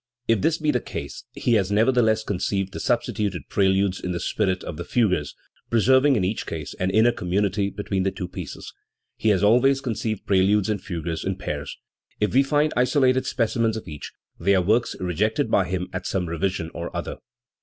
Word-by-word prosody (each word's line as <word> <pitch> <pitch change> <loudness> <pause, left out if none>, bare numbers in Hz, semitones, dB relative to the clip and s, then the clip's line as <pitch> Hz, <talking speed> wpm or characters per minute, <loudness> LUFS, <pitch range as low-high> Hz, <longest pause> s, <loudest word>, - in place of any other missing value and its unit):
If 115 -4 +2
this 160 - +2
be 155 -1 +1
the 125 - +1
case, - - -7
he 120 - 0
has 100 -3 +2
nevertheless 110 0 +3
conceived 95 -1 -2
the - - -5
substituted 115 -4 -1
preludes 95 -1 +2
in 90 - -3
the 85 - -3
spirit 95 -2 -1
of 75 - -6
the 85 - -4
fugues, 90 -8 0 0.3
preserving 130 +5 +4
in 105 - +1
each 100 +4 -2
case 80 -3 -5
an 95 - +1
inner 110 +5 +4
community 100 0 0
between 100 -1 -3
the 95 - +1
two 95 -1 -5
pieces, 90 - -8 0.4
He 110 - +2
always 125 +7 +4
conceived 110 -5 -3
preludes 100 +1 +3
and 100 -3 -2
fugues 85 -3 -4
in 95 0 -1
pairs. 75 -6 -5 0.4
If 105 - 0
we 135 - +6
find 150 +2 +1
isolated 130 +1 +2
specimens 115 -1 0
of 110 - -8
each, 75 -3 -8 0.3
they 100 0 +3
are 95 - +2
works 110 +6 +1
rejected 105 - 0
by 95 - +3
him 90 0 -3
at 95 0 -4
some 95 -2 -1
revision 85 0 -2
or 85 - -5
other. - - -4
100 Hz, 185 wpm, -24 LUFS, 95-115 Hz, 0.4 s, we